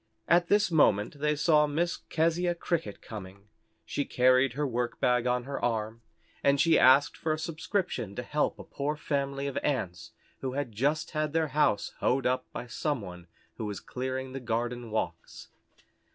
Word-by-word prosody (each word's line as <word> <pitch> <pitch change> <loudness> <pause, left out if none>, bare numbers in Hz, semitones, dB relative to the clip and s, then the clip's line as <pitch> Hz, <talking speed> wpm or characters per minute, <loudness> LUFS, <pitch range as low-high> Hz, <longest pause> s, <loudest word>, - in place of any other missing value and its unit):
At 175 0 +4
this 205 -1 +3
moment 140 -4 +3
they 150 +1 +1
saw 150 0 +4
Miss 165 +4 0
Keziah 170 +2 0
Cricket 165 - -3
coming. 100 -1 -10 0.4
She 145 - -1
carried 130 0 +3
her 145 +3 -1
workbag 125 0 0
on 125 0 +1
her 140 +2 -5
arm, 115 -1 -1 0.4
and 140 0 +4
she 165 +2 +5
asked 130 +3 +6
for 160 - -2
a - - -2
subscription 160 - -3
to - - -4
help - - 0
a - - -9
poor 145 +2 -3
family 140 -2 -2
of 140 -1 -3
Ants 90 - -2 0.3
who 130 -1 -3
had 140 -3 -2
just 145 +9 0
had 155 -1 -1
their 160 -1 +1
house 135 -7 +1
hoed 130 +1 +1
up 130 0 0
by - - -6
some 145 +4 -2
one 90 -3 -9 0.3
who 110 - -4
was 105 -2 -4
clearing 130 +1 -4
the 135 - -4
garden 120 0 -2
walks. 110 - -4
135 Hz, 170 wpm, -29 LUFS, 120-150 Hz, 0.4 s, asked